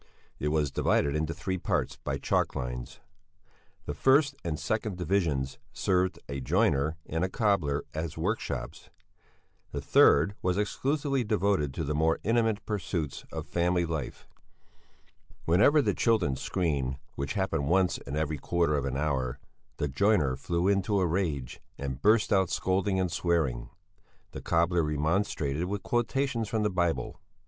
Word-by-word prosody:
It 75 - -1
was 75 -2 +1
divided 70 +2 +1
into 80 +1 -1
three 95 +2 -3
parts - - -1
by 70 - -4
chalk 70 - 0
lines. - - -5 0.8
The 75 - -3
first 140 - +4
and 80 -3 -3
second 110 -3 -2
divisions 75 -7 0
served 90 0 +1
a 70 0 -4
joiner 80 - +1
and 80 +2 -2
a 95 - 0
cobbler 95 -10 +1
as 80 0 -4
workshops; 100 +8 -3 0.8
the - - -3
third 80 +8 +5
was 90 0 0
exclusively 140 +5 0
devoted 100 -8 +1
to 80 - -2
the 75 0 -2
more 80 +2 +2
intimate 115 -1 +1
pursuits 90 -8 -3
of - - -5
family 90 0 +1
life. 80 -5 -5 1.2
Whenever 105 - +5
the - - +1
children 105 - +2
screamed, 70 -4 -1 0.2
which 70 +6 -3
happened 95 -8 0
once 90 +2 +2
in 70 - -6
every 75 -1 -1
quarter 85 -1 +1
of 70 -2 -1
an 65 -1 -2
hour, 65 -4 -1 0.4
the 75 - -1
joiner 75 -2 +2
flew 85 +6 -1
into 100 +1 +2
a 95 - +2
rage 80 -7 -2 0.2
and 70 -1 -5
burst 105 +1 +4
out 95 -2 +3
scolding 95 +1 0
and 90 -2 0
swearing; 75 -9 0 0.6
the - - -7
cobbler 85 +1 +2
remonstrated 75 0 0
with 100 +2 -4
quotations 120 -1 0
from 110 -2 0
the 105 - +1
Bible. 85 -8 -1
85 Hz, 150 wpm, -29 LUFS, 75-100 Hz, 1.2 s, third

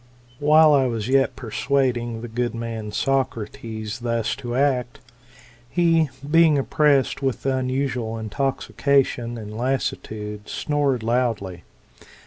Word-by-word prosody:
" - - -30
While 155 +1 +6
I 135 -2 +4
was 115 -3 -3
yet 135 +1 +2
persuading 120 -1 -1
the 120 - -6
good 120 +1 -2
man 115 -2 -5
Socrates 110 -3 -2
thus 115 -2 -1
to 120 0 -5
act, 130 -3 0 0.7
he, 165 -2 +3 0.2
being 160 -1 +5
oppressed 140 -1 +2
with 135 -1 -2
unusual 130 -3 -1
intoxication 130 +1 0
and 105 -1 -8
lassitude, 110 -4 -3
snored 140 -5 0
loudly. 115 -7 -1
125 Hz, 110 wpm, -23 LUFS, 115-140 Hz, 0.7 s, While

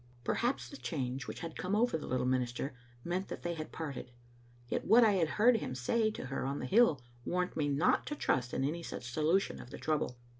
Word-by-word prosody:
Perhaps 240 - 0
the 280 - -9
change 130 - -3
which - - -6
had 165 -2 -5
come 185 +3 -1
over 240 +3 +3
the 160 - -4
little 130 0 0
minister 130 +1 0 0.3
meant 180 +3 -2
that - - -7
they 175 - -1
had 155 -2 -6
parted. 145 -5 -5 0.6
Yet - - -1
what 235 +2 +7
I 220 - +6
had 180 -5 +2
heard 230 +2 +6
him 130 - -4
say 215 - +2
to 215 - -6
her 135 +1 -3
on 135 +2 -1
the - - -4
hill 195 - +4 0.2
warned 180 +4 -1
me 150 -2 +1
not 145 +6 +2
to 295 - -2
trust 125 - 0
in - - -1
any 155 +5 -1
such 125 -6 -6
solution 160 +8 +1
of 120 - -11
the - - -8
trouble. 150 -5 -1
160 Hz, 225 wpm, -33 LUFS, 130-195 Hz, 0.6 s, what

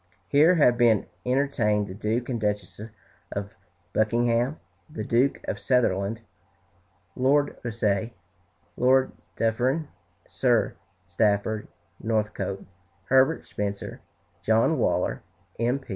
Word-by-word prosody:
Here 155 +6 +5
have 125 -7 +4
been 115 -4 +4 0.2
entertained 125 -6 +1
the 95 - -7
Duke 110 +4 -2
and 120 -4 -3
Duchess 105 -1 -2 0.5
of 100 0 -5 0.4
Buckingham, 120 +5 +1 0.3
the 155 - -5
Duke 125 +4 +1
of - - -3
Sutherland, 110 -3 +1 0.9
Lord 145 +3 +2
Rosse, 110 -3 0 0.7
Lord 130 +1 +3 0.3
Dufferin, 130 +7 0 0.4
Sir 120 -3 +1 0.3
Stafford 105 +3 0 0.3
Northcote, 105 -3 -2 0.4
Herbert 135 +5 +3
Spencer, 100 -1 -5 0.4
John 110 +1 +2
Waller, - - 0 0.4
M. 120 +4 +1
115 Hz, 100 wpm, -26 LUFS, 105-130 Hz, 0.9 s, Here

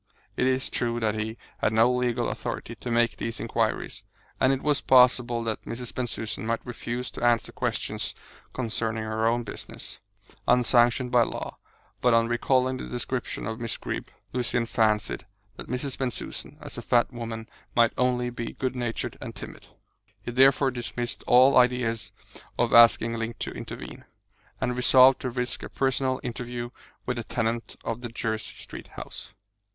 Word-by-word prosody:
It 125 - +2
is 130 0 +1
true 120 -1 -1
that 110 -2 +1
he 110 +1 -4 0.2
had - - +2
no 115 +3 +5
legal 125 -1 0
authority 115 - -4
to 120 +2 -7
make 120 0 +2
these 115 0 -4
inquiries, - - -1 0.4
and 130 - +4
it 135 0 -1
was 150 -1 +2
possible 125 -2 +5
that 110 -2 -2
Mrs. 120 0 -5
Bensusan 115 -4 -3
might 115 -1 -1
refuse 120 +1 -4
to - - -7
answer 120 -1 +3
questions - - -2 0.4
concerning 115 -2 -2
her 110 +1 0
own 120 +1 +1
business, - - -8 0.5
unsanctioned 125 0 +4
by 125 -1 +6
law; - - -3 0.4
but 125 -2 +5
on 115 0 +4
recalling 130 +2 +2
the - - -6
description 125 +1 -3
of 110 +2 -4
Miss 115 -1 -2
Greeb, - - -4 0.3
Lucian 120 -1 +1
fancied 110 -2 +1 0.3
that - - -8
Mrs. 130 +2 -2
Bensusan, 130 -3 -3
as - - -7
a - - -5
fat 120 +1 +2
woman, 115 -1 -5 0.3
might 115 -1 +5
only 125 -1 +1
be 115 -1 -5
good 130 -1 -2
natured 120 -2 -3
and - - -7
timid. - - -10 0.6
He - - -4
therefore 135 +2 +5
dismissed 120 0 -4
all 130 +3 +7
ideas 115 -4 +1 0.5
of - - +1
asking 115 0 +6
Link 115 +1 -3
to - - -4
intervene, - - -8 0.5
and 125 - 0
resolved 130 +1 +6
to 130 - -2
risk 125 0 -2
a - - -7
personal 130 -1 0
interview 120 -1 -4 0.3
with 125 0 -2
the 120 - -3
tenant 115 +1 -2
of 115 +1 -3
the 120 - -5
Jersey 110 -1 -3
Street - - -9
house. 95 - -8
120 Hz, 165 wpm, -27 LUFS, 115-125 Hz, 0.6 s, all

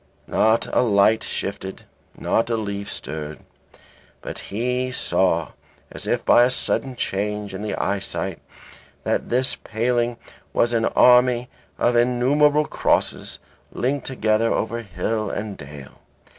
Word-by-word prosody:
Not 110 +1 +2
a - - +5
light 110 -1 +4
shifted, 95 -1 -5 0.3
not 115 - 0
a 115 - +1
leaf 100 -2 -4
stirred, 75 0 -6 0.8
but - - -6
he 125 +4 -1
saw 85 - +1 0.4
as - - -8
if - - 0
by 120 - +7
a 125 - +4
sudden 130 0 0
change 105 -1 -2
in 95 - -5
the 105 -1 -2
eyesight 100 -1 -2 0.6
that - - -1
this 130 +2 +1
paling 120 +1 -1 0.4
was 120 0 +2
an 115 -1 +2
army 125 0 +5 0.3
of 120 - +2
innumerable 140 +5 +3
crosses - - 0 0.3
linked 135 +2 -1
together 115 -3 +1
over 115 +1 -1
hill 110 +1 -2
and 105 -1 -4
dale. 70 -1 -11
115 Hz, 130 wpm, -23 LUFS, 100-125 Hz, 0.8 s, by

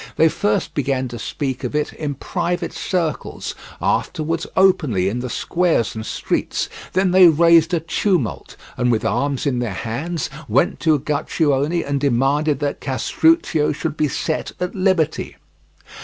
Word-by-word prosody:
They 160 - +5
first 105 -7 -1
began 135 -2 -1
to 120 0 -7
speak 130 +2 -4
of - - -3
it 150 0 -1
in 145 -2 -4
private 175 +4 -2
circles, 170 -5 -3 0.3
afterwards 165 +2 -1
openly 150 - +3
in 110 +5 -1
the 125 0 -4
squares 170 -5 0
and 110 - -5
streets; - - -2 0.2
then 185 0 +2
they 185 -1 +8
raised 165 +1 +5
a 170 -3 +1
tumult, 165 - -1 0.2
and 125 0 +2
with 110 - 0
arms 140 0 0
in 130 -4 0
their 120 -2 -1
hands 140 - -3 0.2
went 125 +6 +2
to 160 -2 +3
Uguccione 145 +2 0
and 140 0 0
demanded 140 +3 +2
that 145 -1 -2
Castruccio 160 - +2
should 155 +1 -3
be 150 - +1
set 155 +2 -3
at 180 0 -2
liberty. 185 -5 0
150 Hz, 150 wpm, -20 LUFS, 135-170 Hz, 0.3 s, they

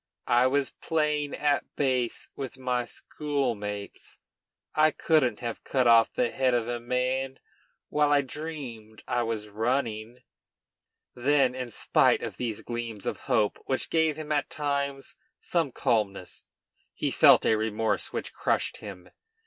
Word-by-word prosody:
I 120 +2 +5
was 140 +1 +1
playing 150 -2 -1
at 145 0 +1
base 130 -4 0
with 135 -1 -6
my 125 -2 -1
schoolmates. 115 -12 -4 0.6
I 155 0 +5
couldn't 155 -6 +1
have 120 -2 -4
cut 130 -2 +1
off 115 -1 +6
the 120 -2 0
head 130 -2 +2
of 120 -1 0
a 120 0 -2
man 130 +2 -1 0.5
while 150 -1 +2
I 145 -1 +5
dreamed 130 -7 -7
I 125 -1 +1
was 110 -2 -3
running." 115 +1 -2 0.9
Then, 130 0 +3
in 130 -1 -5
spite - - +3
of - - -5
these 115 -4 -3
gleams 115 -3 -5
of - - -2
hope, 105 -2 +2
which 130 -2 -1
gave 160 -2 +2
him 155 -1 -6
at 145 -2 +1
times 140 -2 -3 0.2
some 165 -6 0
calmness, 100 -6 -1 0.5
he - - -1
felt - - +6
a 110 - +4
remorse 110 0 0
which - - -4
crushed - - 0
him. 95 -4 -10
125 Hz, 140 wpm, -28 LUFS, 115-145 Hz, 0.9 s, off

